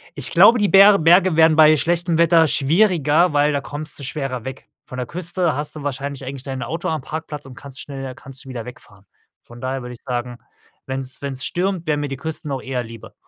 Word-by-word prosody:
Ich - - -2
glaube, 240 - +6
die 205 - +2
Ber 200 +1 +7
Berge 175 +1 +4
wären 160 -1 +5
bei 155 0 +7
schlechtem 170 +1 0
Wetter 165 -1 +4
schwieriger, 160 +1 +2
weil 145 +1 +3
da 140 - -1
kommst 150 +2 -7
du - - -8
schwerer 135 -4 -4
weg. 130 0 -8 0.2
Von 125 - -9
der 125 - -3
Küste 175 -2 -2
hast 150 +1 -4
du 150 - -8
wahrscheinlich 140 0 -5
eigentlich 135 0 -7
dein 130 -2 -5
Auto 165 +5 -4
am 160 -2 -2
Parkplatz 150 0 -7
und 130 -2 -12
kannst 135 -1 -11
schneller 135 -2 -7
kannst 135 +1 -12
du - - -11
wieder 120 -3 -6
wegfahren. 105 -5 -14 0.4
Von 120 +1 -14
daher 130 0 -3
würde 125 0 -8
ich 115 - -13
sagen, 125 -1 -4 0.5
wenn's 130 0 -3
wenn's 135 -2 -3
stürmt, 180 -1 -2
wäre 150 -1 +1
mir 145 0 -2
die 135 - -5
Kürste 155 +1 -5
noch 135 -2 -3
eher 125 -2 -3
lieber. 115 -1 -12
145 Hz, 220 wpm, -20 LUFS, 130-160 Hz, 0.5 s, Ber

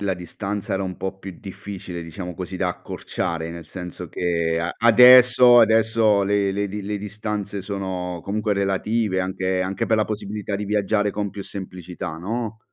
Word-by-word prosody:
la 100 -1 0
distanza 95 +3 -4
era 95 - -1
un 95 -2 -4
po' 95 0 -4
più 95 -3 -9
difficile, 95 -2 -7
diciamo 90 +2 -7
così, 90 +2 -6
da - - +1
accorciare, 80 -1 -4
nel 85 -1 -8
senso 90 -2 -7
che 85 -2 0
a 85 +1 -3
adesso 125 +1 +8
adesso 110 -2 +4
le 100 0 +1
le 100 +1 -1
di 105 +2 -5
le 105 +1 -3
distanze 105 -1 -4
sono 95 -3 -4
comunque 105 +1 -1
relative, 100 +1 0
anche 95 0 -1
anche 95 +1 -2
per 110 - +2
la 110 - +2
possibilità 105 -1 -4
di 100 +1 -3
viaggiare 105 0 +1
con 105 0 -3
più 100 - -7
semplicità, 90 -4 -7
no? 110 +4 -4
100 Hz, 170 wpm, -23 LUFS, 90-105 Hz, -, adesso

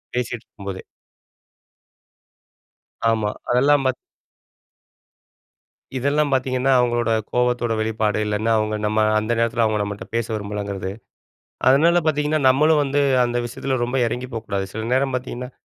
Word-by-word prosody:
பேசிகிட்டு 120 -2 -3
இருக்கும்போதே. 100 -2 -8 2.3
ஆமா. 110 -2 0 0.2
அதெல்லாம் 140 +3 +4
பார்த் 130 - +2 2.0
இதெல்லாம் 145 +3 +1
பார்த்தீங்கன்னா, 130 0 +1
அவங்களோட 120 -1 +1 0.2
கோவத்தோட 125 -1 +1
வெளிப்பாடு 110 -1 0
இல்லைன்னா 105 +2 0
அவங்க 110 0 -1
நம்ம 110 +1 +1 0.2
அந்த 110 +2 -3
நேரத்துல 115 0 +1
அவங்க 110 -1 0
நம்மகிட்ட 100 -1 -5
பேச 115 -1 0
விரும்பலங்கிறது. 100 -2 -4 0.8
அதனால 165 +6 +5
பார்த்தீங்கன்னா, 150 0 +1
நம்மளும் 150 +4 +4
வந்து 140 +1 0 0.2
அந்த 120 0 -1
விஷயத்துல 130 +2 -3
ரொம்ப 125 +2 -2
இறங்கிப் 125 +2 -4
போகக்கூடாது. 100 -3 -3
சில 110 0 -4
நேரம் 135 0 +1
பார்த்தீங்கன்னா, 125 0 -6
120 Hz, 120 wpm, -22 LUFS, 110-135 Hz, 2.3 s, அதனால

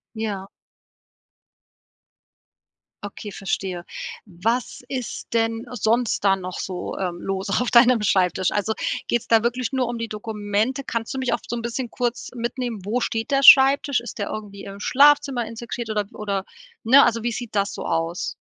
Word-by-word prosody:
Ja. 205 -3 -4 2.5
Okay, 205 +1 -7
verstehe. 190 -2 -3 0.4
Was 220 +7 -2
ist 255 -3 -5
denn 225 0 0
sonst 235 -1 0
da 195 -1 +5
noch 185 -1 -6
so, 185 -2 -5
äh, 185 -2 -1
los 195 +2 -3
auf 250 - 0
deinem 240 -1 +6
Schreibtisch? 185 -2 +2
Also 210 +1 0 0.3
geht's 240 - -1
da 225 -1 +5
wirklich 245 +1 -1
nur 250 -2 0
die 230 0 -4
Dokumente? 215 +4 -2
Kannst 230 +1 -3
du 265 - -3
mich 260 -2 -1
auch - - +1
so - - -4
'n 230 - -4
bisschen 235 +1 -4
kurz 245 -1 -3
mitnehmen? 240 -1 -3
Wo 220 +5 0
steht 225 +1 -2
der 275 0 +2
Schreibtisch? 270 -1 +7
Ist 240 -1 -9
der 205 - -2
irgendwie 205 -2 -7
im 200 0 -9
Schlafzimmer 280 -1 +4
integriert 230 0 -6
oder 210 -1 0
w - - -23
oder 200 -2 -2 0.4
ne, 265 +5 +7
also 230 -1 +1
wie 240 - 0
sieht 240 -1 -6
das 200 -1 +1
so - - -6
aus? 165 +2 -2
225 Hz, 165 wpm, -23 LUFS, 200-245 Hz, 2.5 s, Schreibtisch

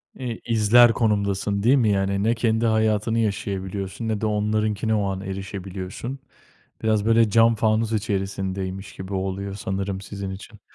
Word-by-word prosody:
Eee, 125 -4 -5
izler 115 +1 +6
konumdasın 100 -3 0
değil 125 +5 +5
mi? 115 -6 +3
Yani, 100 0 +1
ne 115 +2 +2
kendi 115 0 +1
hayatını 110 0 +2
yaşayabiliyorsun, 100 -1 -3
ne 110 -1 -1
de - - 0
onlarınkine 105 0 0
o 105 - +1
an 95 0 -4
erişebiliyorsun. 95 +5 -6 0.6
Biraz 110 -2 +2
böyle 115 0 +4
cam 115 +2 +5
fanus 110 +1 +1
içerisindeymiş 95 -2 -3
gibi 95 +1 -7
oluyor 95 +1 -3
sanırım 95 -1 -3
sizin 100 0 -6
için. 100 +2 -10
105 Hz, 145 wpm, -23 LUFS, 95-110 Hz, 0.6 s, izler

